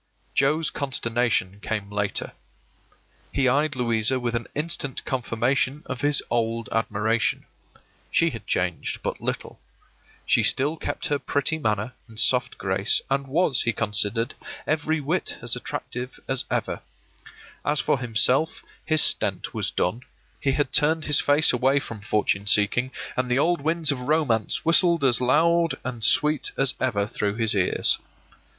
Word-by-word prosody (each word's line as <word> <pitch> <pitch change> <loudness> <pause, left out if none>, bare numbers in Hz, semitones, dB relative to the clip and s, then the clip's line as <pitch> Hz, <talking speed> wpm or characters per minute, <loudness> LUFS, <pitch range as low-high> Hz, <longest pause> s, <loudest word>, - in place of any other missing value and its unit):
Joe's 155 +4 +2
consternation 120 -7 -1
came 105 -1 -4
later. 105 -1 -2 1.0
He 135 -2 +1
eyed 145 +3 +2
Louisa 115 0 +2
with 120 -1 -2
an 120 0 -3
instant 150 -3 -3
confirmation 130 +3 -1
of 130 -1 -5
his 145 -1 +3
old 115 -1 -1
admiration. 110 0 0 0.6
She - - +2
had - - -9
changed - - -2
but - - -3
little. - - -4 0.7
She - - +3
still 145 +4 +2
kept - - -4
her 145 -1 0
pretty 145 +4 -1
manner 110 -1 -1
and 110 -2 -8
soft 125 0 +2
grace, 95 +1 +1
and 135 0 0
was, 145 -1 +1
he 115 - 0
considered, 110 +2 0 0.3
every 155 +1 0
whit 160 +6 -2
as 120 0 -1
attractive 125 0 -6
as 130 -1 0
ever. - - -2 0.8
As 150 0 +2
for 135 - +1
himself, 125 +5 +2 0.2
his 155 -1 +3
stent - - +1
was - - -1
done; 100 +7 -1 0.4
he 135 - 0
had 140 -2 -1
turned 155 +2 +2
his 150 -2 +4
face 145 +2 +4
away 130 +3 +2
from 115 -6 -8
fortune 100 -1 0
seeking, 105 +5 +2 0.3
and 125 0 -1
the 125 - +2
old 170 +3 +2
winds 160 0 +2
of 140 - -3
romance 125 -4 0
whistled 170 -1 +4
as 125 -3 +3
loud 165 +6 +3
and 120 -3 -5
sweet 150 +6 +3
as 135 -1 +2
ever 105 -6 0
through 105 -1 -2
his 110 -1 +1
ears. 95 -3 +2
130 Hz, 150 wpm, -24 LUFS, 115-145 Hz, 1.0 s, his